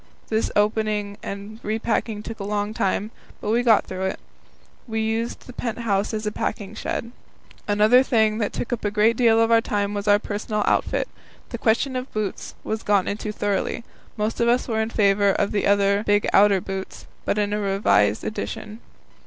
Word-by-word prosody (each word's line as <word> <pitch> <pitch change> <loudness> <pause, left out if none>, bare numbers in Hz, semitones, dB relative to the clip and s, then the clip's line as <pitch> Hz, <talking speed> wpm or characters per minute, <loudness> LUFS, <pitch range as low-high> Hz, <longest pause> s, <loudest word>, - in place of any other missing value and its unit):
This 220 0 0
opening 210 -1 0
and 200 +2 -7
repacking 220 -1 -2
took 225 0 -7
a - - -4
long 205 +1 -2
time, 205 +1 -1 0.3
but 210 - -2
we 235 +2 +3
got 230 -3 +4
through 185 0 -4
it. 190 - -2 0.7
We 220 -1 -2
used 225 +1 -2
the 250 - -10
pent 235 -2 -4
house 205 -4 0
as 215 -1 -3
a 210 - -1
packing 205 -1 -3
shed. 230 +1 -4 0.6
Another 215 +4 +5
thing 220 -4 +2
that 210 - 0
took 245 - -3
up 240 - -4
a 205 - +1
good 215 +2 +3
deal 225 -2 +4
of 225 0 +3
our 230 0 +6
time 205 -2 -1
was 205 0 -4
our 205 0 +6
personal 210 0 -3
outfit. - - +1 0.4
The 235 - -5
question 240 +5 +1
of 255 +1 -4
boots 215 -2 -4
was 220 0 -3
gone 200 -2 +2
into 210 +1 -3
thoroughly. 205 +2 -2 0.3
Most 215 +1 -2
of 235 - +2
us 245 +1 +2
were 220 -2 0
in 220 - -1
favour 200 -2 +3
of - - 0
the 200 -1 +2
big 205 -1 +2
outer 200 -2 +5
boots, 190 0 -6 0.2
but - - -1
in 205 0 0
a 210 - 0
revised 195 - +2
edition. 215 0 -5
210 Hz, 190 wpm, -23 LUFS, 205-225 Hz, 0.7 s, our